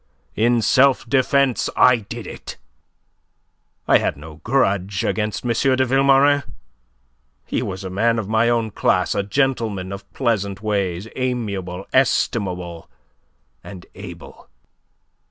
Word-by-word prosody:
In 120 +1 +2
self 130 0 +3
defence 135 0 +2
I 125 -1 +6
did 115 +1 -8
it. - - -9 1.3
I - - +5
had - - -2
no 75 +1 -11
grudge 100 - 0
against 105 +2 -2
M. 120 - +1 0.2
de 130 0 +2
Vilmorin. 135 +2 +4 1.0
He - - -2
was 95 0 -5
a 95 - -6
man 115 +5 +1
of 110 -3 -3
my 110 +2 +2
own 115 -2 0
class; - - +1
a - - 0
gentleman 110 -4 -1
of 100 0 -9
pleasant 100 -5 -1
ways, 100 -2 -1
amiable, 100 -8 -3
estimable, 90 -9 0 0.7
and 95 -3 -10
able. - - -11
110 Hz, 120 wpm, -21 LUFS, 95-125 Hz, 1.3 s, I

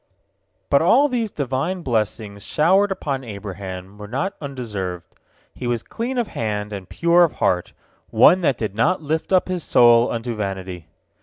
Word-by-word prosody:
But 140 - +5
all 255 - +5
these 240 -5 -1
Divine 145 +5 -2
blessings 105 -4 -2
showered 190 +6 +3
upon 140 -8 -3
Abraham 100 -2 -8
were 105 - -8
not 140 - -2
undeserved. 105 - -5 0.5
He 125 - -6
was 120 -2 -1
clean 245 +3 -4
of 235 -3 0
hand, 105 -1 -3
and 95 -2 -7
pure 170 +1 +4
of 165 - +1
heart, 90 -1 0 0.4
one 185 - +5
that 140 -7 +1
did 110 -4 -3
not 160 - +1
lift 155 +4 -2
up 185 -1 +3
his 180 -3 -3
soul 120 0 +5
unto 115 +1 -3
vanity. 95 -5 -5
120 Hz, 160 wpm, -21 LUFS, 105-170 Hz, 0.5 s, But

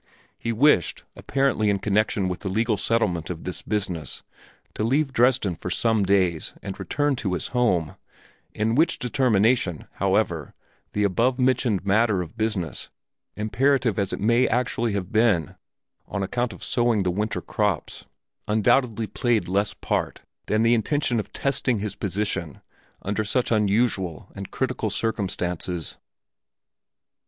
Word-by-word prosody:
He 115 - -2
wished, 115 - +3
apparently 135 -6 +1
in 100 - +2
connection 100 -1 +1
with 90 -1 -3
the 95 - -4
legal 110 +3 +1
settlement 100 -7 0
of 85 -2 -5
this 90 - -5
business, 95 -7 -3 0.5
to - - -2
leave 135 +4 +1
Dresden 120 -6 +3
for 85 - -6
some 110 +2 +2
days 95 -4 +1
and 100 -1 -6
return 145 -1 0
to 100 -7 -2
his 85 - -3
home, 95 - +1 0.6
in 110 +1 0
which 155 +7 +3
determination, 115 - +1
however, - - 0 0.4
the 105 - +1
above 115 +6 +2
mentioned 125 -6 +1
matter 105 0 +3
of 85 +5 -12
business, 110 -8 -3 0.5
imperative 115 +2 +1
as 100 -2 0
it - - -3
may 115 +4 +3
actually 120 -1 0
have 100 0 -3
been 110 - +2 0.5
on 100 -1 -3
account 120 +4 -1
of - - -11
sowing 120 -4 +2
the 90 - +1
winter 105 +4 -2
crops, 105 -7 -2 0.4
undoubtedly 110 +2 +2
played 120 0 0
less 100 +3 0
part - - -2 0.2
than 110 +1 +2
the 115 +1 +4
intention 120 +1 +1
of 105 - -5
testing 135 -3 0
his 105 -1 -3
position 100 -7 -3 0.4
under 105 +2 -1
such 120 +4 0
unusual 105 -5 +1
and 100 -1 -7
critical 130 -4 -2
circumstances. 90 -5 -2
105 Hz, 140 wpm, -24 LUFS, 95-120 Hz, 0.6 s, the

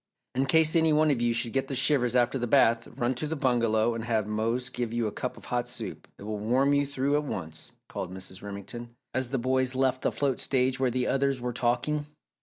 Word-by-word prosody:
"In 135 +2 0
case 160 +3 +4
any 160 -1 +4
one 155 0 +4
of 125 -4 0
you 120 0 +2
should 115 0 -1
get 135 0 0
the 135 - -3
shivers 130 -2 +2
after 125 +2 +2
the 120 - -1
bath, 115 -3 +4
run 120 +2 +1
to 140 +5 -3
the 160 - -2
bungalow 120 -5 +2
and 115 0 -4
have 110 -3 0
Mose 115 +4 -1
give 125 -2 -3
you 120 -1 0
a 105 - -1
cup - - -4
of - - -12
hot - - -2
soup - - -7
it - - -11
will 105 0 -4
warm 130 +6 +2
you 145 0 +2
through 140 0 -1
at 150 - -1
once," 80 - -6
called 90 - -5
Mrs. 95 0 -8
Remington, 110 +4 -7 0.2
as 130 -1 -1
the 135 - -1
boys 130 +1 +1
left 130 -1 +1
the - - +1
float 140 -3 -1
stage 130 -1 +1
where 130 -1 +2
the 125 +1 0
others 135 -1 +1
were 125 0 -3
talking. 125 +5 0
125 Hz, 235 wpm, -28 LUFS, 115-135 Hz, 0.2 s, case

